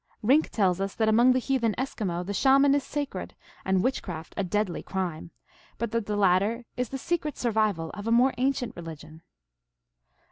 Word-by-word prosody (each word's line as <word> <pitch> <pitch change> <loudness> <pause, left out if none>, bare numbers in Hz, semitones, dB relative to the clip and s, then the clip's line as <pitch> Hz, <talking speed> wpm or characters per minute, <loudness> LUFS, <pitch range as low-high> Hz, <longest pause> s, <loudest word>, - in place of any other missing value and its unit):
Rink 275 +8 +4
tells 190 -3 +1
us 195 0 -3
that 220 -1 +2
among 240 +4 +5
the - - +1
heathen 250 -4 0
Eskimo 190 -9 -3
the 200 - -4
Shaman 275 +6 +5
is 285 -1 +1
sacrecl, 290 -1 -4 0.3
and 190 -1 +1
witchcraft 175 -11 -3
a 200 - -1
deadly 195 0 -1
crime, 180 -4 -4 0.5
but 235 -2 -3
that 230 -2 -1
the 210 -1 -1
latter 205 +5 +2
is 250 -2 -2
the 270 - -4
secret 305 0 -2
survival 215 -8 0
cf 205 +1 -6
a - - +1
more 250 +3 +4
ancient 260 -2 0
religion. 160 -1 -10
215 Hz, 175 wpm, -27 LUFS, 185-255 Hz, 0.5 s, among